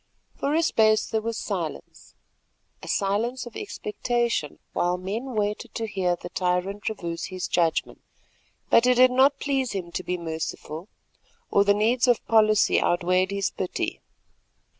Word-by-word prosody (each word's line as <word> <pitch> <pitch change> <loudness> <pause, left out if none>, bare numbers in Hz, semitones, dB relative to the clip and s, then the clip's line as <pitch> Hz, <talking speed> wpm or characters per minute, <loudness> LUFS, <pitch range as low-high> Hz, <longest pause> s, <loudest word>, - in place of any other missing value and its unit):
For 285 +2 -1
a 330 - +3
space 215 -7 +3
there 220 - -1
was 230 +1 -3
silence, - - -5 0.7
a - - -10
silence 225 +6 0
of 240 - -11
expectation 235 - -2 0.2
while 175 +1 +1
men 220 +8 -4
waited 210 0 -2
to 225 - -2
hear 190 -4 0
the - - -9
tyrant 185 +3 -1
reverse 170 -6 -4
his 185 -1 -4
judgment. 165 -2 0 0.7
But 230 +2 +6
it 250 - +5
did 255 +1 +6
not 270 +2 +4
please 270 -4 -1
him 180 -3 -4
to 185 - -3
be 180 +1 -2
merciful, 160 0 -5 0.6
or 200 - +5
the 200 0 +3
needs 235 +4 +2
of 245 -2 +2
policy 215 -2 +4
outweighed 185 +1 +2
his 200 -1 -1
pity. 185 - -3
205 Hz, 150 wpm, -25 LUFS, 180-240 Hz, 0.7 s, But